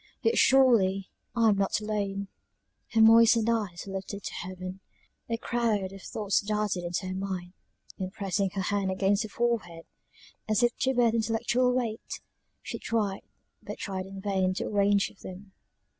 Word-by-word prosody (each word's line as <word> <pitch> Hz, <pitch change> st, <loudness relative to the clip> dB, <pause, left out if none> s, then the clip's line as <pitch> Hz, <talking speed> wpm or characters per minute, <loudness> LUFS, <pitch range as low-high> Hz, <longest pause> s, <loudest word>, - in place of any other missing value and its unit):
Yet 455 Hz, -, +3 dB
surely, 215 Hz, -8 st, +4 dB, 0.2 s
I 230 Hz, -2 st, +4 dB
am 205 Hz, -, +3 dB
not 195 Hz, +1 st, +1 dB
alone!" 200 Hz, -2 st, -2 dB, 0.7 s
Her 225 Hz, -, +4 dB
moistened 230 Hz, 0 st, +6 dB
eyes 205 Hz, -7 st, -2 dB
were 195 Hz, -, -7 dB
lifted 195 Hz, +1 st, -5 dB
up 200 Hz, -, -13 dB
to -, -, -5 dB
heaven; 185 Hz, +1 st, -6 dB, 0.5 s
a 230 Hz, -, 0 dB
crowd 225 Hz, -5 st, 0 dB
of 195 Hz, -, -10 dB
thoughts 205 Hz, 0 st, 0 dB
darted 210 Hz, -3 st, -1 dB
into 175 Hz, +2 st, -2 dB
her 185 Hz, -, -3 dB
mind, 185 Hz, -2 st, -4 dB, 0.5 s
and 185 Hz, -1 st, -3 dB
pressing 200 Hz, -1 st, -1 dB
her 195 Hz, -, -1 dB
hand 200 Hz, 0 st, 0 dB
against 195 Hz, +2 st, +2 dB
her 215 Hz, -, -4 dB
forehead, 210 Hz, -8 st, -2 dB, 0.6 s
as 215 Hz, +2 st, +2 dB
if 240 Hz, 0 st, +3 dB
to 265 Hz, 0 st, +1 dB
bear 240 Hz, -2 st, +4 dB
the 230 Hz, -, 0 dB
intellectual 235 Hz, +3 st, +1 dB
weight, 235 Hz, -3 st, -3 dB, 0.4 s
she -, -, -5 dB
tried, 210 Hz, -4 st, -1 dB, 0.4 s
but -, -, -7 dB
tried 190 Hz, -1 st, -4 dB
in 195 Hz, 0 st, -8 dB
vain, 190 Hz, -2 st, 0 dB
to -, -, -2 dB
arrange 200 Hz, -1 st, +2 dB
them. 190 Hz, +2 st, -10 dB
200 Hz, 170 wpm, -28 LUFS, 190-225 Hz, 0.7 s, moistened